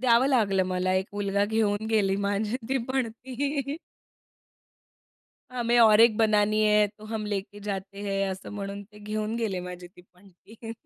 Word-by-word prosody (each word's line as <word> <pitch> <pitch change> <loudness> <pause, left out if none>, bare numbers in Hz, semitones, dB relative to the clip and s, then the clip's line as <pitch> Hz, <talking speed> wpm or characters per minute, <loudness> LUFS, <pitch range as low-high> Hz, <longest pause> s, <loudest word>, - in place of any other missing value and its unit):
द्यावं 245 +1 +4
लागलं 205 -8 +2
मला 185 0 0
एक 190 +1 0
मुलगा 200 0 0
घेऊन 215 0 0
गेला 200 -3 +2
माझी 205 +3 -1
ती 270 0 +1
पणती. 265 +3 -2 1.7
हमें 240 -1 +1
और 220 -1 +7
एक 230 -2 +6
बनानी 215 -1 +3
है, 210 0 +4
तो 210 +1 -16
हम 220 -1 -4
लेके 205 0 -4
जाते 200 -1 -5
हैं. 195 -1 -1
असं 190 +1 -7
म्हणून 200 0 -5
ते 210 - -14
घेऊन 215 +1 -3
गेले 215 -6 -2
माझी 180 0 -8
ती 180 0 -18
पणती. 200 +5 -13
210 Hz, 155 wpm, -27 LUFS, 195-225 Hz, 1.7 s, और